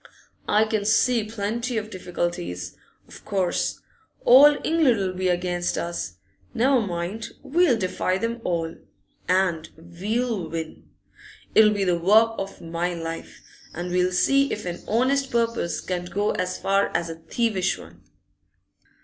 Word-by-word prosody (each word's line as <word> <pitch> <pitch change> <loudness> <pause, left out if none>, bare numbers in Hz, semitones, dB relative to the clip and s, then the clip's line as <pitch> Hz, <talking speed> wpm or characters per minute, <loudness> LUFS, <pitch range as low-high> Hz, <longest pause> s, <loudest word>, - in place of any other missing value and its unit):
I 215 +1 +4
can 215 -1 -1
see 225 +2 +3
plenty 225 +3 -3
of 215 0 -4
difficulties, 175 - -4 0.3
of - - -13
course. 190 -3 -1 0.4
All 285 +4 +8
England 310 -9 +3
'll 190 -1 -1
be 185 0 -1
against 175 0 -1
us. 85 0 -4 0.4
Never 255 +1 +3
mind, 185 +2 -4
we'll 295 -2 +3
defy 185 -1 -1
them 230 +3 -3
all, 165 -2 -1 0.6
and 180 -4 +1
we'll 190 +3 -3
win. 160 0 -6 0.6
It'll 220 -1 +7
be 205 -2 0
the 175 -2 +1
work 220 +6 +5
of 195 0 -6
my 170 +1 -2
life, 165 0 -7 0.3
and 175 +1 -4
we'll 180 0 +2
see 275 +9 +3
if 210 - -4
an 175 -1 -5
honest 265 +4 +1
purpose 230 -7 -1
can't 180 -1 -4
go 205 +2 0
as 185 0 -2
far 195 +1 +2
as 170 - -3
a 165 0 -7
thievish 215 -6 0
one. - - -14
190 Hz, 140 wpm, -24 LUFS, 175-230 Hz, 0.6 s, All